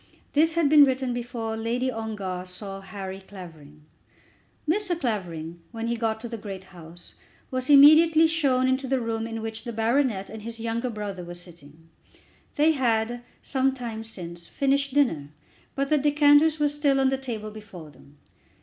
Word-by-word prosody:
This 315 +2 +4
had 335 -2 +2
been 295 0 +8
written 260 -2 +1
before 235 -2 -4
Lady 240 +3 -1
Ongar 210 -5 -4
saw 195 +1 -7
Harry 195 0 -7
Clavering. 160 -6 -13 0.8
Mr. 360 0 0
Clavering, 175 - -4
when 225 -1 -5
he 235 +1 -1
got 225 -1 -1
to 240 - -5
the 230 -1 -6
great 195 -2 -7
house, 170 0 -11 0.4
was 255 +1 -2
immediately 310 +3 +8
shown 275 -6 +2
into 260 +1 0
the 265 0 +1
room 225 -1 -3
in 225 -1 -5
which 225 0 -5
the 240 - -5
baronet 225 -2 0
and 220 0 -9
his 230 +1 -6
younger 230 +2 -2
brother 205 -5 -5
were 175 0 -8
sitting. 165 -3 -14 0.7
They 310 +1 +4
had, 240 -4 0 0.2
some 265 -1 0
time 230 -3 -5
since, 170 -6 -9
finished 275 0 0
dinner, 165 - +1 0.5
but 275 0 -1
the 305 - +3
decanters 295 +2 +4
were 295 - +3
still 290 -1 +1
on 265 0 +3
the 270 - 0
table 220 -5 -5
before 195 -8 -11
them. 145 0 -20
230 Hz, 170 wpm, -25 LUFS, 195-275 Hz, 0.8 s, been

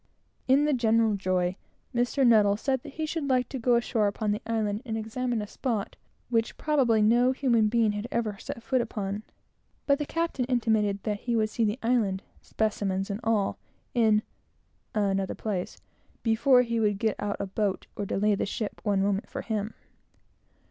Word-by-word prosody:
In 275 +3 +5
the 300 - +2
general 225 -3 +3
joy, 185 -1 0 0.4
Mr. 245 +3 +2
N. 205 -2 +4
said 265 +2 -1
he 310 +2 -4
should 310 -2 -3
like 250 -2 +2
to 265 - -4
go 245 +1 +3
ashore 235 -2 +1
upon 210 +1 -1
the 210 - -2
island 215 -2 -1
and 225 -4 -3
examine 225 +1 -2
a - - -4
spot 225 -3 -3 0.3
which 230 -2 0
probably 255 -8 +2
no 240 +4 +4
human 235 -5 +2
being 225 -1 +2
had 205 +2 -4
ever 220 -3 -1
set 230 - -7
foot 250 +2 +1
upon; 205 -3 -3 0.6
but 280 0 +3
the 295 - -2
captain 330 -6 -1
intimated 220 -5 +1
that 210 -1 -2
he 240 +1 -1
would 215 -1 +1
see 230 - 0
the 210 +2 0
island 220 -5 +1 0.2
specimens 200 -2 -1
and 200 - -3
all, 220 -3 +1 0.3
in 220 -3 +3 0.7
another 195 -2 0
place, 195 -5 -3 0.5
before 250 +3 +4
he 235 -1 -1
would 210 -2 +2
get 220 +1 0
out 205 0 -2
a - - -1
boat 195 0 -2
or 205 - -3
delay 205 +1 +1
the 200 - -1
ship 210 +1 -4
one 200 -2 +1
moment 200 0 -1
for - - -5
him. 215 -1 -3
220 Hz, 175 wpm, -27 LUFS, 205-245 Hz, 0.7 s, In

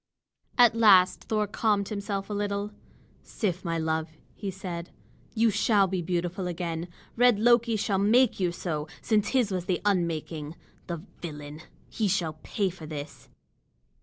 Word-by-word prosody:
At 240 -3 +7
last 200 -5 +5
Thor 215 -1 0
calmed 205 -1 0
himself 200 -1 -3
a 210 - -5
little. 205 0 -2 0.5
"Sif, 185 -5 -3
my 165 -2 -1
love," 160 0 -2 0.2
he 200 - -5
said, 180 -2 -6 0.5
"you 225 0 +4
shall 205 0 +3
be 190 -1 -2
beautiful 175 +2 -2
again. 170 -1 -3 0.3
Red 245 -2 +5
Loki 235 +1 +4
shall 200 -2 0
make 235 +5 +4
you 180 -2 +1
so, 155 -3 -4
since 210 -3 +1
his 245 -6 +1
was 180 -2 -2
the 180 -1 0
unmaking. 165 -5 -1 0.3
The 170 -2 -5 0.2
villain! 150 -2 -7 0.3
He 220 - -1
shall 170 -5 -1
pay 200 -4 -1
for 170 -3 -10
this!" 145 -1 -8
190 Hz, 150 wpm, -27 LUFS, 170-210 Hz, 0.5 s, At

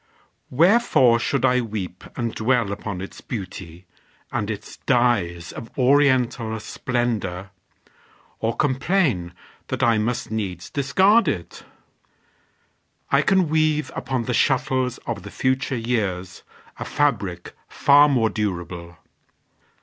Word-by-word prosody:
Wherefore 155 - +4
should 135 +2 0
I 125 -1 +3
weep 100 -6 -6
And 115 -3 -2
dwell 115 -2 +1
upon 100 -2 -5
its 95 - -9
beauty, 90 -5 -7 0.5
and 105 - -2
its 105 -1 -6
dyes 105 -10 +1
Of 115 - -9
oriental 130 -4 +2
splendor, 105 -6 -3 0.9
or 115 +1 -1
complain 135 - +1 0.4
That - - -2
I 115 -2 +4
must 120 +1 -2
needs 95 -6 -4
discard 190 - +3
it? - - -4 1.5
I - - +5
can 190 -3 +3
weave 155 -1 +1
Upon 125 -1 -2
the 125 - -2
shuttles 130 -1 +1
of 115 -5 -4
the 100 - -9
future 130 +3 -1
years 100 -6 -2 0.4
A - - -3
fabric 100 -12 -1
far 145 +1 +5
more 115 -5 +2
durable. 85 -4 -4
120 Hz, 115 wpm, -23 LUFS, 100-135 Hz, 1.5 s, I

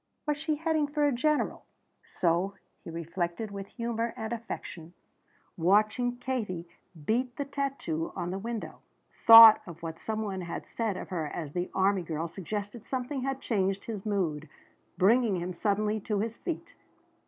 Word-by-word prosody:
Was 295 -1 0
she 310 0 0
heading 315 -1 +1
for 295 0 +1
a 290 - +3
general? 300 +4 0 0.4
So 180 +3 0 0.3
he - - -8
reflected 170 +5 -3
with 200 -1 -6
humor 230 0 -3
and 220 +1 -3
affection, 180 -7 -7 0.6
watching 215 +7 +2
Katie 220 -9 -3 0.4
beat 245 - 0
the 285 - -3
tattoo 275 - -3
on 175 0 -3
the 190 - -3
window. 230 +1 -5 0.5
Thought 225 -1 +12
of 170 -1 -10
what 165 0 -5
some 220 0 -3
one 195 -3 -3
had 170 -1 -5
said 220 -5 -2
of - - -7
her 165 -5 -2
as 150 -1 -6
the 180 0 -2
army 195 0 +3
girl 165 -1 -3
suggested 205 +5 -5
something 260 +1 -3
that 270 +1 -2
changed 195 -3 0
his 215 -4 -5
mood, 165 -8 -1 0.5
bringing 215 +3 +4
him 180 +1 -4
suddenly 210 +3 0
to 210 +1 -2
his 220 +3 -2
feet. 340 +3 -5
210 Hz, 160 wpm, -29 LUFS, 180-245 Hz, 0.6 s, Thought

